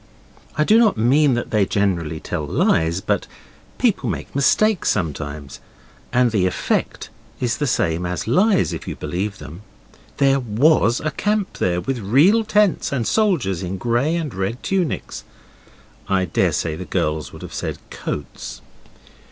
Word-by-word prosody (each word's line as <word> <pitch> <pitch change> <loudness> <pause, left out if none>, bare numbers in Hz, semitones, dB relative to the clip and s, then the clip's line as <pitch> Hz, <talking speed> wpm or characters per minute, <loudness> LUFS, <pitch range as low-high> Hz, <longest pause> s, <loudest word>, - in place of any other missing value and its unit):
I 150 - +4
do 215 +8 +5
not 220 -4 +3
mean 135 +4 +3
that 120 - -4
they 105 -2 +3
generally 90 -6 -1
tell - - -4
lies, 80 +3 +1
but - - -1 0.5
people - - +1
make - - -5
mistakes 210 +8 +3
sometimes, 75 -5 -3 0.5
and 125 -1 +3
the 95 -4 +2
effect 90 - -2 0.3
is 120 -2 0
the 145 - -1
same 85 -8 0
as 90 0 -3
lies 190 - +3
if - - -7
you - - -4
believe 95 +3 -3
them. 85 +6 -10 0.6
There 135 0 +3
WAS 120 0 +2
a 155 - -1
camp 210 +1 -1
there 90 -1 +1
with 135 +2 -3
real 145 - +4
tents 210 -3 +2
and 125 -5 -1
soldiers 155 - +1
in 95 +1 -4
grey 120 - 0
and 160 -6 -3
red 95 +6 -3
tunics. 185 -5 -2 0.9
I 95 -1 +2
daresay 80 -1 0
the - - -7
girls 75 0 -2
would - - -11
have - - -9
said - - -4
coats. 75 -3 -6
120 Hz, 150 wpm, -21 LUFS, 90-155 Hz, 0.9 s, do